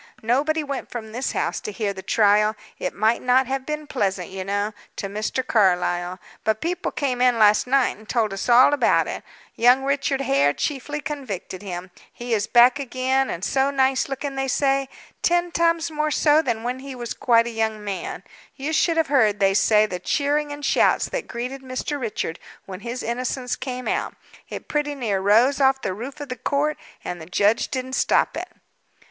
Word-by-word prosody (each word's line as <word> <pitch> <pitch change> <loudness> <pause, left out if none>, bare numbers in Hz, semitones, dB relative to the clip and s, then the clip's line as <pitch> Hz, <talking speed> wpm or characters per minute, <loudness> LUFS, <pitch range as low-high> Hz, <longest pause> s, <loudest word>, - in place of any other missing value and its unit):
Nobody 295 +7 +1
went 280 -2 -5
from 220 -3 -7
this 250 +4 -3
house - - -1
to 210 - -5
hear 205 -1 -2
the 190 - -8
trial 210 +1 +3 0.2
it 180 - -3
might 220 +3 +2
not 255 +1 +3
have 265 +1 -3
been 300 0 -3
pleasant, 195 -10 -2
you 190 0 -5
know, 205 +2 -2 0.2
to - - -4
Mr. 215 +6 -3
Carlyle; 180 -4 +1 0.3
but 220 0 +1
people 355 +4 -2
came 255 -4 -2
in 250 -2 +4
last 215 +1 +4
night 270 0 +2
and 215 0 -17
told 220 -4 +1
us 195 +5 -4
all 250 +4 +7
about 290 - +3
it. - - -5 0.3
Young 250 +3 +4
Richard 275 0 0
Hare 140 - +2
chiefly 295 - -3
convicted 235 - -6
him. 180 -2 -6 0.2
He 240 0 -5
is 210 -1 +1
back 245 +3 +5
again, 265 0 0
and 170 - -3
so 270 0 +2
nice 265 -1 +1
looking, 275 +1 -4
they 270 0 -2
say 270 0 +1 0.3
ten 350 0 +2
times 335 -1 +1
more 305 0 0
so 300 0 +4
than 245 -2 -2
he 270 0 -8
was 240 -2 -5
when - - -26
quite 230 -2 +5
a 235 - -4
young 220 -1 -2
man. 195 -4 -5 0.3
You 295 +3 -4
should 330 +1 +2
have 325 - +3
heard, 220 -8 +2
they 195 -1 +3
say, 210 +1 +4
the 180 -4 -5
cheering 290 +8 0
and 290 0 -6
shouts - - +3
that - - -4
greeted 250 +3 -5
Mr. 265 +2 -4
Richard 210 -7 -3 0.3
when 185 -2 -8
his 235 +4 -5
innocence 250 +2 -2
came 255 -1 -5
out; - - -1 0.3
it - - -7
pretty 295 -1 -1
near 220 -8 -1
rose 230 +9 +3
off 265 0 +3
the 185 - -1
roof 245 +9 -7
of 290 -2 -7
the 255 - -4
court, 290 +4 0 0.3
and 175 -1 -5
the 160 - -10
judge 205 +4 +2
didn't 260 -1 -4
stop - - +2
it." - - -4
250 Hz, 195 wpm, -23 LUFS, 210-275 Hz, 0.3 s, all